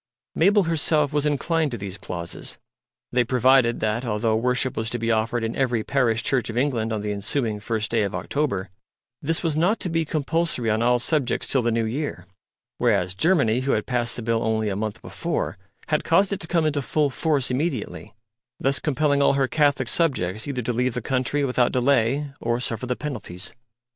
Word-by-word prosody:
Mabel 200 +5 +4
herself 155 -3 +2
was 150 0 +1
inclined 155 +2 +1
to 120 - -4
these 100 0 -7
clauses. 85 -1 -4 0.5
They 125 0 +3
provided 125 0 +3
that, 110 +2 0
although 110 -1 0
worship 125 +2 0
was 110 0 -2
to 120 - -2
be 115 0 0
offered 115 +1 0
in 115 0 -2
every 125 -5 0
parish 120 -4 +1
church 130 -4 0
of 115 - -4
England 120 -4 0
on 110 -2 -2
the 105 0 -2
ensuing 105 +2 -1
first 110 -1 -2
day 115 -1 +2
of 100 -2 -1
October, 105 -11 -2 0.5
this 165 +4 -1
was 160 -3 +1
not 180 +8 +2
to 185 - -2
be 165 0 +1
compulsory 155 -5 0
on 110 +1 +1
all 125 +1 +4
subjects 130 +1 0
till 130 - +2
the 120 - +1
New 115 0 +1
Year; 120 - -3 0.5
whereas, 90 +1 +2
Germany, 125 - +2
who 135 +1 0
had - - 0
passed 120 -2 -1
the 120 - -6
Bill 115 0 0
only 110 -1 0
a 95 - -2
month 105 +1 -4
before, - - -3 0.3
had - - +1
caused 200 0 +3
it 195 - -3
to 165 - -5
come 165 -2 +1
into 145 -2 0
full 145 +1 0
force 145 -4 0
immediately, 130 -3 -3 0.5
thus 135 0 +1
compelling 145 -1 +1
all 140 - +4
her 135 -1 +2
Catholic 145 -3 +2
subjects 110 - 0
either 130 -3 -3
to 120 - -1
leave 125 +1 0
the 125 - -3
country 135 +3 0
without 125 -2 +2
delay 135 +2 +1
or 120 +1 -1
suffer 125 0 -4
the 125 - 0
penalties. 115 -9 -5
125 Hz, 200 wpm, -24 LUFS, 115-145 Hz, 0.5 s, Mabel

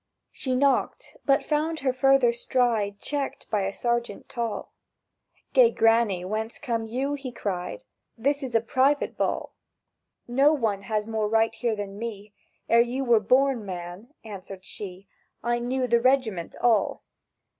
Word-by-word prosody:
She 260 -2 -2
knocked, 275 +1 +1
but 275 0 +3
found 310 +1 -1
her 260 -2 +1
further 260 -2 +4
stride 235 -5 0
Checked 285 -2 -4
by 210 -2 +2
a - - -2
sergeant 235 -1 -2
tall: 235 -3 -4 0.8
"Gay - - +7
Granny, 225 - +2
whence 220 +3 -3
come 230 -5 -2
you?" 265 +5 -2
he 275 -3 -5
cried; 200 - -4 0.3
"This 280 +5 0
is 255 -4 -4
a 225 - +5
private 265 +5 +1
ball." - - -2 0.7
—"No 275 +5 +4
one 220 -9 0
has 215 -1 0
more 220 -2 -1
right 225 0 +2
here 230 -1 -1
than 200 -1 -6
me! 210 -3 -6 0.3
Ere 230 0 +6
you 245 +3 -1
were 235 -2 +5
born, 255 +2 +2
man," 185 - -8
answered 195 -2 -9
she, 195 -1 -8 0.4
"I 240 +1 +1
knew 255 +2 -1
the 235 -1 +3
regiment 240 -9 +1
all!" 235 -3 +2
235 Hz, 150 wpm, -26 LUFS, 210-265 Hz, 0.8 s, Gay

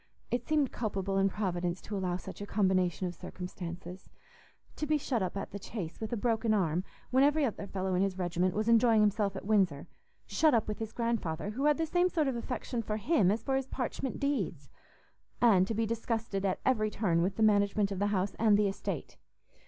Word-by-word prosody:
It 245 0 -1
seemed 300 -4 +2
culpable 195 -3 -1
in 195 0 +3
Providence 180 -3 -2
to 210 - -5
allow 180 -2 -1
such 190 +2 -9
a 205 - -5
combination 185 -3 +1
of 175 - -3
circumstances. 180 0 -8 0.7
To 300 - -2
be 305 +1 +3
shut 255 -5 -1
up 185 +1 -2
at - - -5
the 200 - -6
Chase 185 -4 -6
with 220 - -4
a 240 - -1
broken 225 0 +1
arm 180 -3 +1 0.3
when 260 +1 +5
every 295 +1 +4
other 210 -4 -4
fellow 190 -1 -2
in 180 - +2
his 195 -1 0
regiment 180 0 0
was 215 +1 0
enjoying 230 -1 +5
himself 205 -1 +1
at 190 - -6
Windsor—shut 200 - 0
up 225 - +1
with 210 - -4
his 225 -1 -4
grandfather, 210 -7 -2
who 265 +6 -2
had 300 -1 +4
the 325 - 0
same 355 +3 +2
sort 315 -5 +1
of 265 - 0
affection 240 0 -3
for 215 -1 -3
him 215 - +3
as 215 +3 0
for 270 - 0
his 265 -1 -1
parchment 260 0 -3
deeds! 205 - -2 0.7
And 195 -6 +5
to 225 - -2
be 225 +1 +1
disgusted 225 -3 -2
at 185 - -1
every 215 -5 +2
turn 180 -6 +1
with 185 +3 0
the 220 - +1
management 205 -1 +3
of 195 - -3
the 205 - +2
house 195 -1 0
and 215 -2 +5
the 210 -1 +3
estate! 195 - -4
210 Hz, 210 wpm, -31 LUFS, 185-235 Hz, 0.7 s, when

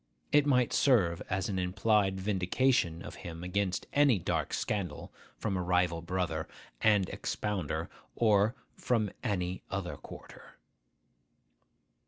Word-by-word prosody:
It 145 0 +5
might 125 -4 +3
serve 95 -12 +3
as 95 0 0
an 95 -2 -2
implied 95 +1 +2
vindication 95 -1 +1
of - - -8
him 85 0 -7
against 95 0 -1
any 140 -6 +5
dark 85 - -1
scandal 100 -4 -3 0.2
from 105 -3 -2
a 90 - 0
rival 90 -2 +1
brother 85 -2 -2 0.3
and 105 -4 +4
expounder, 100 -7 -3 0.3
or 110 0 +3 0.2
from 110 -5 0
any 90 -3 -1
other - - -3
quarter. - - -13
95 Hz, 120 wpm, -31 LUFS, 90-110 Hz, 0.3 s, It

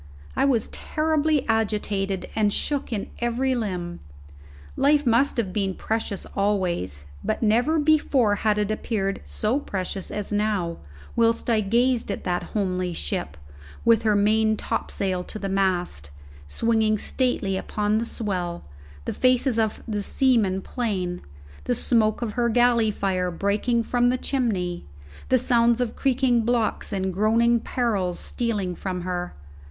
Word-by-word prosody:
I - - +2
was 250 -6 +2
terribly 310 -2 0
agitated, 205 -3 -1
and 210 -2 +2
shook 285 +5 -1
in 210 -3 -3
every 240 +3 0
limb. 180 -7 -3 0.8
Life 290 +1 +3
must 245 +4 +3
have 200 -6 -1
been 195 -3 -1
precious 220 -3 -3
always; 180 - -1 0.2
but 215 - -1
never 240 +9 +3
before 290 -8 +3
had 210 0 +1
it 210 0 0
appeared 200 -3 -2
so 225 +6 -1
precious 190 -6 -4
as 210 0 -5
now, 205 -5 0 0.4
whilst 230 +1 +2
I 220 -2 +3
gazed 235 +4 +1
at 200 - -3
that 180 -1 -1 0.2
homely 185 -3 -1
ship, 70 - -3 0.5
with 230 -1 +5
her 215 -2 +2
main 215 +1 +3
topsail 185 -3 -2
to - - -7
the 200 - -4
mast, 180 - -1 0.4
swinging 220 - +1
stately 215 -4 0
upon 210 +2 0
the 230 - -2
swell, 180 -7 -3 0.4
the - - -2
faces 255 -1 +2
of 220 -1 -1
the 210 -2 -2
seamen 205 -5 +2
plain, 190 -7 -2 0.4
the 245 - +1
smoke 225 -1 +1
of 220 -3 -3
her 240 +1 +1
galley 235 -1 +3
fire 185 -3 -1
breaking 205 +6 0
from 245 +1 +2
the 255 - +1
chimney, 200 -11 -2 0.4
the 255 - +5
sounds 235 -1 +3
of 240 -2 -1
creaking 255 -3 +2
blocks 230 -1 0
and 190 -2 -1
groaning 230 +4 +3
parrels 205 -8 -1
stealing 210 -7 -2
from 180 0 -4
her. 180 0 -4
215 Hz, 145 wpm, -24 LUFS, 195-240 Hz, 0.8 s, with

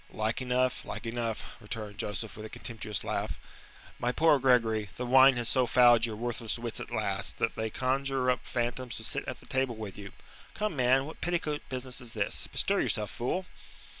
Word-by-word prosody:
"Like 110 +5 -1
enough, 125 0 +1
like - - -6
enough," 115 -1 -2
returned 105 -2 -6
Joseph, 105 +1 -3
with 110 - -8
a 110 - -7
contemptuous 110 -3 -4
laugh. - - -2 0.6
"My 120 - +1
poor 155 +1 +4
Gregory, 115 -5 +3
the 125 - -2
wine 130 +1 +7
has 120 -1 0
so 130 -1 +3
fouled 120 -2 +6
your 110 - -5
worthless 115 0 -2
wits 115 -1 -4
at - - -6
last, - - -1
that - - 0
they 110 0 -2
conjure 130 +1 +1
up 125 - 0
phantoms 120 0 -2
to - - -7
sit - - -1
at - - -5
the - - -16
table 130 -2 0
with 105 -2 -7
you. 100 -1 -8 0.4
Come, 210 -5 -1
man, 130 +1 +3
what 160 - -10
petticoat 165 -4 -1
business 130 0 -3
is 120 -2 -8
this? 105 -2 -1
Bestir - - +1
yourself, 105 -1 0
fool." 180 +10 -2
120 Hz, 195 wpm, -30 LUFS, 110-130 Hz, 0.6 s, wine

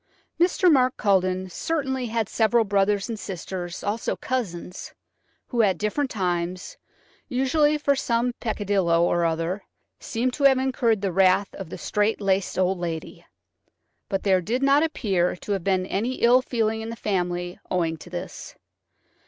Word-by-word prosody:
Mr. 360 +1 +4
Mark 255 -2 +3
Culledon 185 -2 +1
certainly 265 - -2
had 225 -2 -1
several 230 +2 +2
brothers 200 0 +1
and 225 -3 -5
sisters, 180 -2 -6
also 210 +3 -1
cousins, 185 -8 -4 0.5
who 240 -3 +2
at 195 -5 +2
different 235 - -1
times–usually 245 - -2
for 285 -1 +2
some 240 -1 0
peccadillo 195 -6 +1
or 175 0 +2
other–seemed 190 +8 -3
to 280 - 0
have 265 -1 +6
incurred 255 -5 +1
the 195 -2 -1
wrath 190 +2 +3
of 190 -4 -8
the - - -7
strait 210 +1 0
laced 195 -2 0
old 185 0 +1
lady. 165 -2 -5 0.9
But 195 -2 -1
there 190 -2 +3
did 240 +9 -1
not 275 +1 +5
appeal 195 - 0
to 195 - -7
have 195 -3 -1
been 185 -1 +1
any 220 +7 -1
ill 245 +2 +5
feeling 225 -3 -1
in 225 - -5
the 230 - -5
family 180 -4 -2
owing 170 -3 0
to - - -12
this. - - -7
205 Hz, 150 wpm, -24 LUFS, 185-245 Hz, 0.9 s, have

